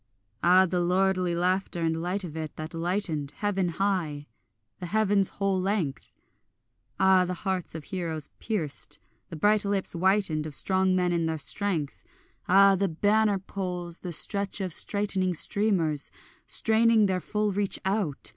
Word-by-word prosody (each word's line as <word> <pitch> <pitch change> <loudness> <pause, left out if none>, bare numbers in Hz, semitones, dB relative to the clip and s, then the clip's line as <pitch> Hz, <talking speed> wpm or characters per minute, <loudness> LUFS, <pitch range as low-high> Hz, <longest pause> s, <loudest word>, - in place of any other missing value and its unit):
Ah 180 +3 +5
the 180 0 -1
lordly 180 0 +1
laughter 180 0 -1
and 165 0 -1
light 185 +3 -2
of 165 -4 -7
it, 155 -2 -6
that 155 +2 -7
lightened 165 -4 -2
Heaven 195 -3 -1
high, 170 -6 -2 0.5
the 180 - -5
heaven's 205 -1 +2
whole 195 -2 -1
length! 185 -8 -2 0.9
Ah 190 -1 +5
the 180 0 -3
hearts 185 -4 -2
of 160 - -6
heroes 165 -5 -5
pierced, 175 -10 -2 0.3
the - - -7
bright 205 +6 +2
lips 200 -1 -1
whitened 180 -4 +1
Of 150 - -1
strong 190 +3 +4
men 180 -1 +1
in 165 -1 0
their 160 0 -2
strength! 165 -2 -1 0.4
Ah 195 +1 +6
the 195 0 0
banner 205 +5 +2
poles, 180 -3 -6
the 180 - -6
stretch 200 +5 -1
of 185 -4 -3
straightening 195 -3 0
streamers 170 -7 +2 0.4
Straining 225 -1 +3
their 190 -2 0
full 210 +1 -1
reach 200 0 +1
out! 190 -7 -1
185 Hz, 150 wpm, -27 LUFS, 170-200 Hz, 0.9 s, Ah